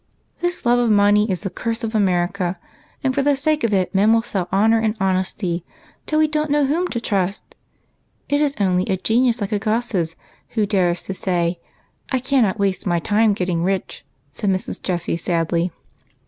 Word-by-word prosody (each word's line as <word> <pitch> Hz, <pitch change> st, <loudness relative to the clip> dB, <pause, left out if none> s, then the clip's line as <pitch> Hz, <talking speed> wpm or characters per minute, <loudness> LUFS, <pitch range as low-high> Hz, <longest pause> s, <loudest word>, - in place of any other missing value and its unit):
" -, -, -39 dB
This 350 Hz, -4 st, -1 dB
love 240 Hz, +1 st, +4 dB
of 240 Hz, -1 st, +2 dB
money 210 Hz, +1 st, +4 dB
is 185 Hz, -2 st, -1 dB
the 195 Hz, -3 st, -4 dB
curse 230 Hz, +5 st, -3 dB
of 225 Hz, 0 st, -3 dB
America, 185 Hz, -2 st, 0 dB, 0.5 s
and 265 Hz, -1 st, +1 dB
for 280 Hz, -, +1 dB
the 285 Hz, +1 st, +3 dB
sake 305 Hz, +2 st, 0 dB
of 230 Hz, -, +1 dB
it 190 Hz, -3 st, +1 dB
men 200 Hz, +3 st, +4 dB
will 225 Hz, 0 st, +3 dB
sell 195 Hz, -6 st, -3 dB
honor 220 Hz, +4 st, +4 dB
and 220 Hz, 0 st, -1 dB
honesty, 185 Hz, -2 st, -1 dB, 0.4 s
till 310 Hz, -, 0 dB
we 310 Hz, 0 st, +4 dB
don't 305 Hz, 0 st, -1 dB
know 290 Hz, 0 st, +3 dB
whom 330 Hz, +7 st, 0 dB
to 240 Hz, -, -3 dB
trust, 200 Hz, -3 st, -2 dB, 0.7 s
and 285 Hz, +1 st, +1 dB
it -, -, +4 dB
is 285 Hz, -1 st, 0 dB
only 185 Hz, -2 st, +2 dB
a 190 Hz, -, 0 dB
genius 230 Hz, +4 st, +1 dB
like 200 Hz, -, -2 dB
Agassiz 210 Hz, -5 st, -1 dB, 0.4 s
who 215 Hz, -, +3 dB
dares 180 Hz, -4 st, +1 dB
to 195 Hz, -, -4 dB
say, 175 Hz, -2 st, -1 dB, 0.3 s
' -, -, -28 dB
I 260 Hz, -, +2 dB
cannot 250 Hz, -5 st, +1 dB
waste 195 Hz, -2 st, -1 dB
my 175 Hz, -1 st, +2 dB
time 210 Hz, +6 st, +2 dB
in 210 Hz, -, +4 dB
getting 180 Hz, -3 st, -1 dB
rich,' 190 Hz, 0 st, -2 dB, 0.2 s
" 140 Hz, -, -41 dB
said 200 Hz, +7 st, -2 dB
Mrs. 190 Hz, -1 st, -2 dB
Jessie 175 Hz, -2 st, -1 dB
sadly. 170 Hz, 0 st, 0 dB
205 Hz, 205 wpm, -21 LUFS, 185-235 Hz, 0.7 s, love